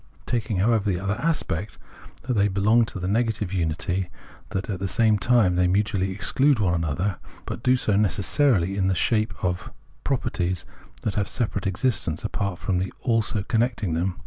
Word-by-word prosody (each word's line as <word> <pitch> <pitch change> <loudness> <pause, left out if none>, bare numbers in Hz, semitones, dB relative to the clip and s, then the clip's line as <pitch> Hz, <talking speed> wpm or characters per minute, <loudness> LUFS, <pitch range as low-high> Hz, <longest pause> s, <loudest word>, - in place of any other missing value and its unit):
Taking, 115 -4 -1
however, 105 +1 +2
the 90 -3 0
other 100 +2 -1
aspect, 110 - -1 0.5
that 125 - -1
they 100 -2 +3
belong 105 +4 +3
to 100 - -7
the 90 - -3
negative 105 -2 0
unity, 90 +1 -1 0.4
they 110 - -2
at 95 -1 -3
the 95 - -1
same 110 +1 +3
time 110 -3 +3 0.2
mutually 100 -1 +1
exclude 130 +8 +2
one 95 -5 +1
another; 85 +4 -1 0.3
but - - -5
do 125 +1 +4
so 110 -5 +1
necessarily 100 - +2
in 95 -1 +2
the 95 - +2
shape 110 +4 +1
of 90 0 -2 0.3
properties 95 -9 -1 0.4
that 105 - -1
have 100 -1 0
a - - -2
separate 105 -5 -1
existence 95 - 0
apart 100 -3 -2
from 90 0 -1
the 95 +1 -2
" - - -34
also 115 -4 +1
" - - -21
connecting 115 -7 0
them. 90 +2 -1
100 Hz, 180 wpm, -24 LUFS, 95-115 Hz, 0.5 s, do